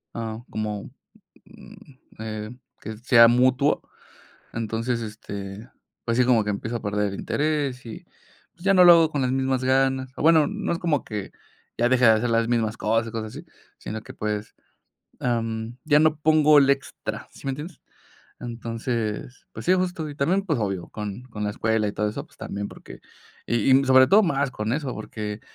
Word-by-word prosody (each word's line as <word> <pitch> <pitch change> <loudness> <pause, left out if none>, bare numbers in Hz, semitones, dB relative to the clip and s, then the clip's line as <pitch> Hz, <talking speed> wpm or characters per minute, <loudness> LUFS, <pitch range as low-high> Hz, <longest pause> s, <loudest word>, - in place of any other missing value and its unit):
ah, 115 -1 -4
como, 105 -1 -4 0.6
mm, - - -15 0.4
eh, 110 +1 -6 0.2
que 110 0 -7
sea 115 0 +6
mutuo, 130 +4 +3 0.7
entonces, 115 +2 -2
este, 105 0 -7 0.4
pues 115 -1 0
sí, 125 - +5
como 120 -3 +4
que 105 - -5
empiezo 110 +3 -3
a - - -14
perder 105 -1 -1
el - - -5
interés 145 -4 -1
y 110 - -9 0.5
pues 175 - -16
ya 195 - +4
no 180 - +7
lo 175 - +10
hago 165 -2 +4
con 145 - -2
las 125 - +1
mismas 130 -1 0
ganas. 130 0 +1
O - - -4
bueno, 160 -1 +5
no 210 -2 -3
es 170 - -2
como 160 -6 0
que 105 -3 -6 0.5
ya 120 - +3
deje 130 -1 +3
de 110 - +8
hacer 115 +2 +1
las 115 0 +2
mismas 115 -2 0
cosas 115 +1 0
y - - -6
cosas 110 -1 -5
así, - - -9 0.3
sino 110 +1 -6
que, - - -12
pues, 105 0 -4 0.7
am, 115 -1 -2
ya 150 -1 +5
no 155 -1 +3
pongo 155 -1 +5
el 140 -1 +3
extra, 140 0 -4
¿sí - - -16
me - - +1
entiendes? 150 +4 -8 0.6
Entonces, 115 0 -4
pues - - -8
sí, 185 - +5
justo, 180 -4 -2
y - - -9
también, 175 +8 +1
pues, 160 -9 0
obvio, 95 -4 -3
con 105 +3 -6
con 110 -4 -7
la 105 - -1
escuela 110 0 0
y 100 - -4
todo 105 - -1
eso, 105 - -5
pues, - - -26
también, 100 0 -5
porque - - -12 0.5
y 120 +2 +2
y, - - -1
sobre 130 0 +6
todo, 210 +3 +6
más 140 -7 0
con 110 -1 -3
eso, 135 -2 -2
porque 105 -1 -6
120 Hz, 195 wpm, -24 LUFS, 110-140 Hz, 0.7 s, lo